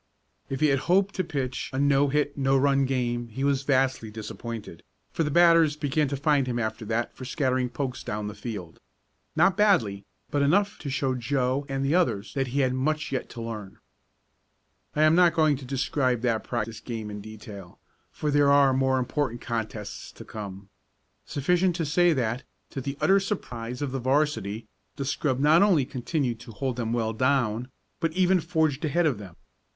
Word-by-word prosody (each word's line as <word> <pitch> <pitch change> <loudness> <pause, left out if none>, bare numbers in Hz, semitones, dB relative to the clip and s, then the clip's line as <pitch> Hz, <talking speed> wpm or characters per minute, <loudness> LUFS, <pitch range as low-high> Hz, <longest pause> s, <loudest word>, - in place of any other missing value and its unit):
If 135 +1 -4
he 155 - +5
had 135 -1 +2
hoped 195 +2 +3
to 185 - -1
pitch 130 -6 -3
a 130 - -4
no 140 0 +3
hit, 145 +1 0
no 135 -1 +2
run 140 0 +3
game 120 -2 -1
he 115 +4 -5
was 140 -1 +2
vastly 130 -4 +1
disappointed, 110 -2 -7 0.3
for - - -2
the 150 - -1
batters 165 -1 +5
began 150 0 0
to 140 +1 -3
find 140 -1 +2
him 120 -1 -1
after 110 -1 -3
that 115 +2 -2
for - - -9
scattering 130 -1 0
pokes 130 -1 -4
down 105 0 -3
the 105 - -5
field. 100 -6 -7 0.6
Not 180 +4 +4
badly, 165 - +2 0.3
but 145 - +1
enough 200 +8 +2
to 145 - -5
show 135 -1 0
to 125 - -4
Joe 130 +2 0
and 135 0 -1
the 140 - +1
others 140 - +1
that 135 -2 -1
he 135 +3 0
had 130 -1 +1
much 150 +4 -1
yet 130 - -3
to 115 - -7
learn. 105 -4 -7 1.2
I 150 - +3
am 155 0 +6
not 175 0 +5
going 155 -2 +4
to 135 - -10
describe 130 -2 0
that 115 -3 0
practice 115 -2 -3
game 110 -3 -6
in 105 0 -6
detail, 100 -3 -10 0.3
for 150 - -2
there 145 -1 +4
are 140 -1 +5
more 130 0 +2
important 130 -1 -1
contests 110 -3 -5
to - - -11
come. 100 -2 -8 0.6
Sufficient 175 +5 +1
to 170 -2 -1
say 175 +4 +3
that, 120 -2 -1 0.3
to 135 - -4
the 140 +2 -4
utter 195 +1 +5
surprise 125 - -4
of 140 - -2
the 135 - -2
'varsity, 125 -6 0 0.3
the 140 - -4
scrub 135 -1 0
not 150 +4 +5
only 180 -10 +4
continued 125 -2 -2
to 115 -1 -11
hold 130 +2 -3
them 115 -2 -2
well 115 -2 0
down, 125 -1 +1 0.3
but 165 -2 -1
even 185 +1 +3
forged 160 -4 0
ahead 165 +3 +1
of 135 -9 +1
them. 95 -5 -10
135 Hz, 190 wpm, -26 LUFS, 115-150 Hz, 1.2 s, am